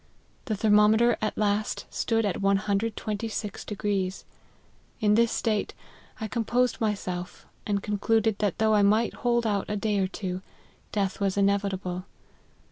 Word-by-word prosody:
The 215 - -1
thermometer 215 +3 +4
at 215 - -2
last 210 0 0
stood 225 -1 0
at 200 - -1
126; 210 +1 -1 1.3
in 210 -3 +3
this 230 +1 +4
state 215 -3 -1 0.4
I 220 - -3
composed 240 +2 0
my 215 -2 +2
self, 180 -2 -6 0.2
and 200 -1 0
concluded 215 +1 +1
that 205 -3 0
though 220 0 +3
I 210 - +5
might 215 +3 +3
hold 235 -1 0
out 205 -3 0
a 210 - -1
day 210 0 0
or 190 - +2
two, 185 -1 -4 0.5
death 195 -2 -1
was 200 -1 0
inevitable. 195 -2 0
210 Hz, 135 wpm, -27 LUFS, 200-220 Hz, 1.3 s, I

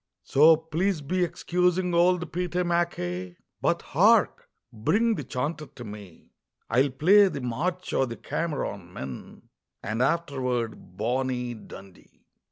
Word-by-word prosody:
"So 155 +3 +6
please 160 +3 -1
be 180 +6 -1
excusing 180 +1 0
old 175 +1 +2
Pete 180 0 -3
MacKay 170 - -1 0.2
But - - +1
hark! - - +3 0.2
bring 215 - +2
the 150 - -4
chanter 145 +4 -3
to 120 - -11
me, 105 -5 -11 0.4
I'll 130 +5 +3
play 185 +10 +5
the 180 - -4
'March 175 +10 -3
o' 135 - +2
the 115 -2 -7
Cameron 105 - -4
Men,' 65 -6 -9 0.3
And 110 +3 -2
afterward 130 - -1
'Bonnie 125 +2 -1
Dundee.'" 100 -4 -14
140 Hz, 125 wpm, -26 LUFS, 115-175 Hz, 0.4 s, So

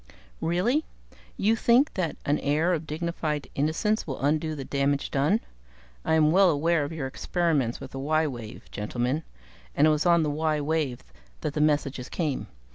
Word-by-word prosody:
"Really? 215 - +1 0.5
You 215 +3 +3
think 240 +6 +3
that 170 -5 -2
an 145 +1 +2
air 155 +5 +1
of 160 -2 -3
dignified 155 -3 -2
innocence 165 +10 0
will 135 - -4
undo 155 +2 0
the 135 -2 -6
damage 140 +1 0
done? 150 +11 +2 0.6
I - - +2
am 155 -1 +4
well 190 +2 +6
aware 165 +1 +2
of 145 - -4
your 160 -4 -4
experiments 140 -3 0
with - - -9
the 135 - -6
y 155 +3 +1
wave, 120 -7 -6
gentlemen 120 +7 -2 0.5
and 145 - +5
it 155 - +5
was 150 +3 +1
on 170 -1 +5
the 150 - 0
y 155 0 0
wave 145 -4 -1 0.4
that 145 - -2
the 150 - 0
messages 145 -4 +1
came. 155 -6 -2
155 Hz, 175 wpm, -27 LUFS, 140-170 Hz, 0.6 s, well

